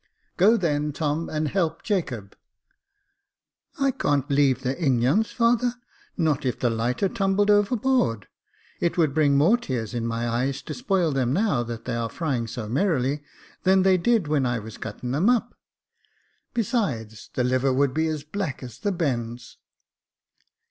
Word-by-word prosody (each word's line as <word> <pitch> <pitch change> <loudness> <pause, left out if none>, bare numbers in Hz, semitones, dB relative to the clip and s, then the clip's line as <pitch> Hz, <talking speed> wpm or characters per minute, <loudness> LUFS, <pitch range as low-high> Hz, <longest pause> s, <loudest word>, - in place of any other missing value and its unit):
" - - -43
Go, 215 +6 +5
then, 150 -5 0
Tom, 155 +2 -2
and 155 0 -1
help 165 -1 -1
Jacob." 125 - -2 1.4
I 275 -1 +3
can't 145 - 0
leave 140 -2 +3
the 130 - 0
ingons, 135 - +2
father, 240 +1 +2 0.4
not 155 -4 +1
if 125 -2 -1
the 120 - +1
lighter 120 - 0
tumbled 195 +2 +1
overboard; 205 - +2 0.5
it 170 - 0
would 155 -5 +2
bring 145 -2 +3
more 170 +12 +5
tears 125 - -4
in 115 -1 -2
my 115 +1 -2
eyes 130 +4 -1
to - - -6
spoil 195 - 0
them, 130 -2 0
now 190 - +1
that 115 -1 -6
they 125 - -2
are 115 -1 -2
frying 130 -4 -2
so 115 -1 -5
merrily, 140 - 0 0.4
than 190 0 +4
they 190 -1 +5
did 220 -2 +2
when 150 -2 +1
I 120 -1 0
was 110 0 -9
cutting 115 +3 -5
them 160 - +2
up. 240 -1 +1 1.0
Besides, 185 - -2
the 125 - +1
liver 130 +2 +2
would 135 0 +2
be 160 +1 +1
as 155 -2 -3
black 155 -4 -4
as 125 -4 -9
the 205 - -1
bends." 120 -9 -3
145 Hz, 160 wpm, -25 LUFS, 125-195 Hz, 1.4 s, Go